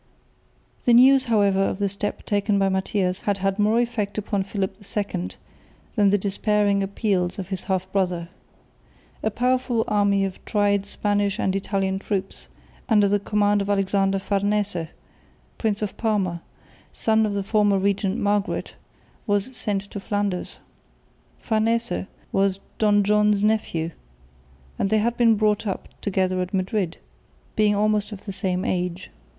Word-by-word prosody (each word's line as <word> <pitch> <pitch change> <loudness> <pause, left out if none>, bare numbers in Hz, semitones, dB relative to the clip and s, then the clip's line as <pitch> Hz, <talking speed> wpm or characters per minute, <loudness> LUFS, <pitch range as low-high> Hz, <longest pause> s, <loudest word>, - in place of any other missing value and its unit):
The 240 - +6
news 265 +2 +6
however 200 -4 +3
of 195 - 0
the 200 0 0
step 200 +1 -4
taken 205 0 +1
by 195 -1 +2
Matthias 190 -1 -1
had 205 -1 0
had 195 +1 -1
more 215 +3 +3
effect 230 -4 -2
upon 205 -1 -1
Philip 195 -1 -3
II 200 - -3 0.7
than 205 -1 +4
the 205 - +4
despairing 205 0 +1
appeals 195 -2 -1
of 190 -2 -6
his 190 -2 -4
half 185 -1 0
brother. 180 -3 0 0.9
A 220 - +1
powerful 250 0 +1
army 200 -1 +2
of 190 -1 -7
tried 200 -1 +1
Spanish 205 -1 0
and 190 - 0
Italian 195 -1 -1
troops 195 -1 -4 0.4
under 210 -3 +5
the 205 +1 +2
command 205 0 +1
of 200 - -3
Alexander 195 -1 +1
Farnese, 200 -3 -1 0.7
Prince 215 -2 0
of 210 - -3
Parma, 195 -7 0 0.5
son 220 0 +2
of 210 -2 -1
the 200 - -1
former 205 -1 +2
regent 200 +1 0
Margaret, 205 -1 -1 0.5
was 205 +5 0
sent 200 -4 -1
to 205 - -5
Flanders. 205 -2 -2 0.8
Farnese 230 -1 0 0.2
was 195 0 +1 0.2
Don 205 -1 +4
John's 210 0 +3
nephew, 190 -7 0 0.9
and 195 - +1
they 220 - +3
had 230 +2 +1
been 230 -2 +4
brought 210 0 +1
up 195 - -4
together 185 -2 0
at 180 +2 -3
Madrid, 185 -2 -1 0.6
being 210 -1 +3
almost 210 +1 +1
of 205 -2 -9
the 200 - -5
same 190 -2 -1
age. 180 0 -2
200 Hz, 145 wpm, -24 LUFS, 195-210 Hz, 0.9 s, The